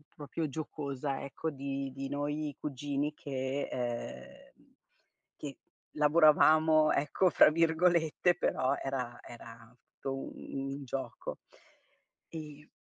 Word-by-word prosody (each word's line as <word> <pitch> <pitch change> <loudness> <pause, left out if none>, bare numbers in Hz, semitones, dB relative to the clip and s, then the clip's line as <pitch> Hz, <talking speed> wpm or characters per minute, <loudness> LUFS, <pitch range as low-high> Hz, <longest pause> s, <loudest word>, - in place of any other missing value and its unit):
proprio 150 +2 -3
giocosa 140 -2 -4
ecco 160 +3 -4
di 135 -1 -4
di 135 0 -4
noi 145 +1 -2
cugini 145 +1 -2
che 135 -1 -3
ehm, 120 -1 -6 0.6
che 140 -3 -7 0.4
"lavoravamo", 155 0 +6
ecco 150 +6 +2
fra 155 - +7
virgolette, 165 +1 +3
però 130 -6 +1
era 125 -3 -3
era 115 0 -12 0.2
tu 135 0 -4
un - - -9 0.2
un 140 - -8
gioco. 135 +1 -5 0.9
E 150 -2 -9
145 Hz, 105 wpm, -32 LUFS, 135-155 Hz, 0.9 s, fra